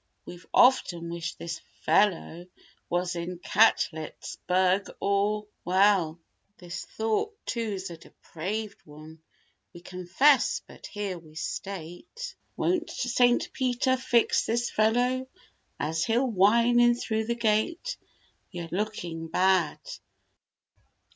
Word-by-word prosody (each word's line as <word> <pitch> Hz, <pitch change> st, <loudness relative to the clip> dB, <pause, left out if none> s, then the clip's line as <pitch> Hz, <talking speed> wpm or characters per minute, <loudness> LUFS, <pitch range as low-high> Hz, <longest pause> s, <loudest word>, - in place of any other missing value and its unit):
We've 175 Hz, 0 st, -11 dB
often 175 Hz, -10 st, +3 dB
wished 170 Hz, 0 st, -5 dB
this 165 Hz, -1 st, -6 dB, 0.2 s
"fellow" 180 Hz, -3 st, +1 dB, 0.4 s
was 175 Hz, 0 st, -1 dB
in 175 Hz, +1 st, -4 dB
Catletts 175 Hz, -5 st, +1 dB
burg 185 Hz, +2 st, +2 dB
or—. 205 Hz, +1 st, +1 dB, 0.2 s
Well 185 Hz, -3 st, +3 dB, 0.4 s
This 175 Hz, -1 st, -7 dB
thought, 225 Hz, -, -2 dB
too's 205 Hz, -6 st, -3 dB
a 170 Hz, -, -8 dB
depraved 200 Hz, +7 st, -6 dB
one, 155 Hz, +1 st, -13 dB, 0.5 s
we 175 Hz, -, -10 dB
confess, 185 Hz, +11 st, +2 dB
but -, -, -12 dB
here 200 Hz, -4 st, -4 dB
we 155 Hz, -2 st, -18 dB
state— 195 Hz, -, -6 dB, 0.2 s
Won't 350 Hz, -2 st, 0 dB
Saint 245 Hz, 0 st, +1 dB
Peter 260 Hz, 0 st, +1 dB
fix 240 Hz, -2 st, +2 dB
this 240 Hz, +2 st, 0 dB
"fellow" 245 Hz, +4 st, +1 dB, 0.5 s
as 160 Hz, +2 st, -1 dB
he'll 235 Hz, +4 st, +2 dB
whine 235 Hz, +2 st, +4 dB
in 240 Hz, 0 st, +5 dB
through 220 Hz, -2 st, -2 dB
the 235 Hz, +1 st, -1 dB
gate— 240 Hz, -, 0 dB, 0.5 s
"You're 170 Hz, -1 st, -7 dB
looking 175 Hz, -5 st, -3 dB
bad." 185 Hz, -1 st, +2 dB
200 Hz, 110 wpm, -27 LUFS, 175-235 Hz, 0.5 s, in